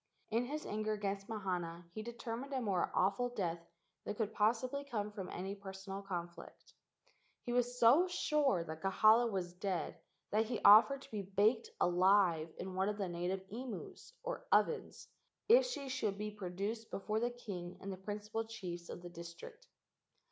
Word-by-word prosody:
In 230 +3 +2
his 300 +4 -4
anger 215 +1 -1
against 200 -1 -3
Mahana 175 -5 -3
he 215 - -4
determined 235 +3 -5
a 265 - +1
more 195 -7 0
awful 200 +7 +2
death 180 -8 -2 0.4
than 210 - -4
could 220 -1 -2
possibly 245 +6 +1
come 215 -7 -3
from 195 -3 -6
any 190 +2 -4
personal 195 0 -7
conflict. 175 -3 -7 0.7
He 240 - -3
was 245 0 +1
so 275 +11 +7
sure 300 - +2
that 160 -1 -7
Kahala 220 +4 +5
was 180 -3 -2
dead 185 -1 -3 0.3
that 220 +2 +3
he 230 0 -2
offered 225 +7 +8
to - - -15
be 210 -2 -2
baked 205 +5 +2
alive 180 -2 +4
in 185 +1 -5
one 190 +2 +1
of 210 - -3
the 195 -3 -2
native 180 +2 -2
imus, 245 - -7
or - - -4
ovens, 460 - +1 0.4
if - - +7
she 285 - -4
should 225 -7 -1
be 210 0 -4
pro¬ 180 -4 -6
duced 220 +4 -3
before 215 +2 -1
the 240 +1 +1
king 195 -8 -7
and 195 0 -5
the - - -7
principal 210 +3 -4
chiefs 175 -6 -6
of 175 - -7
the 175 - -7
district. 175 - -10
210 Hz, 170 wpm, -36 LUFS, 185-235 Hz, 0.7 s, offered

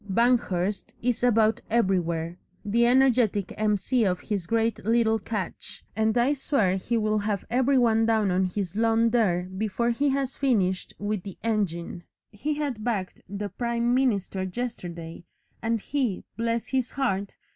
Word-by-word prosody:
Banghurst 205 -4 +1
is 245 -1 0
about 225 -2 +3
everywhere, 175 -6 0 0.3
the 235 +3 +3
energetic 245 -6 +3
M.C. 215 +3 +1
of 180 -3 +1
his 200 -6 -3
great 230 +1 0
little 225 +1 +2
catch, 200 -3 -5
and 220 +1 +1
I 245 +4 +3
swear 260 -9 +1
he 230 +5 -1
will 215 -1 +1
have 205 -1 -2
every 260 +2 +3
one 225 -2 +3
down 220 -4 +2
on 185 +1 +2
his 185 0 -3
lawn 225 +1 +3
there 195 -7 +2
before 210 +5 -1
he 280 +5 +1
has 270 -1 -1
finished 195 -9 0
with 205 -1 -2
the 195 0 -9
engine; 185 -6 -1 0.3
he 290 +9 -2
had 280 -7 -3
bagged 210 -6 -2
the 205 +1 -4
prime 235 +1 0
minister 210 -7 +1
yesterday, 180 -5 -5 0.4
and 230 0 0
he, 250 -4 -2
bless 230 +1 -1
his 260 -2 -1
heart! 200 -7 -1
220 Hz, 150 wpm, -26 LUFS, 190-240 Hz, 0.4 s, about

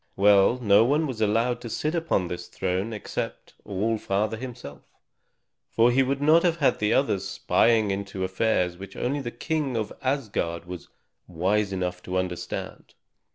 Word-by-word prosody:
Well, 100 +3 +5
no 105 -3 +5
one 145 +6 +2
was 125 -6 -5
allowed 115 +3 +1
to 120 - -7
sit 155 +7 -2
upon 165 - 0
this 90 0 -6
throne 95 +4 -2
except 105 - -5
All 105 +3 -1
Father 105 +3 -1
himself, 115 - -8 0.9
for 115 +2 +4
he 130 +2 +3
would 135 +1 0
not 160 +3 +6
have 165 -5 +2
the 105 0 +1
others 100 -8 +1
spying 110 -3 +2
into 95 -1 -4
affairs 95 -2 0
which 95 0 -9
only 140 +3 -1
the 120 - -4
King 140 +1 -2
of 110 -2 -3
Asgard 105 -11 -2
was 90 -1 -8 0.4
wise 95 +4 0
enough 90 -1 -3
to 90 +1 -3
understand. 90 -1 -5
105 Hz, 155 wpm, -26 LUFS, 95-125 Hz, 0.9 s, not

